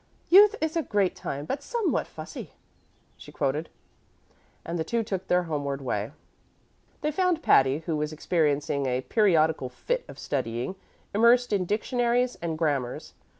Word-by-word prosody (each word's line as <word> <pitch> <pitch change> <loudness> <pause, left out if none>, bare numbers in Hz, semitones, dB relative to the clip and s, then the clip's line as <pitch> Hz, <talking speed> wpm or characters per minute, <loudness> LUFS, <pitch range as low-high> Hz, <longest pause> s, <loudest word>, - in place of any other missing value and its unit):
"'Youth 410 +4 +8
is 315 +1 -1
a 330 - +2
great 205 - 0
time, 140 +1 -5
but 270 - -3
somewhat 470 +2 -1
fussy,'" - - -9 0.6
she - - -12
quoted; 150 +3 -1 1.0
and 170 +1 -3
the - - +1
two 235 +5 -1
took 190 -3 -4
their 180 0 +3
homeward 145 -4 -3
way. 115 -4 -3 0.9
They 300 - 0
found 355 0 +1
Patty, 135 +4 +4
who 165 - -1
was 150 0 -2
experiencing 145 -3 0
a 125 0 0
periodical 160 - +2
fit - - -2
of - - -11
studying, 125 +4 -3 0.4
immersed 235 +2 +4
in 190 -3 +1
dictionaries 240 +4 0
and 165 -2 -3
grammars. 140 -6 -2
170 Hz, 150 wpm, -27 LUFS, -, 1.0 s, Youth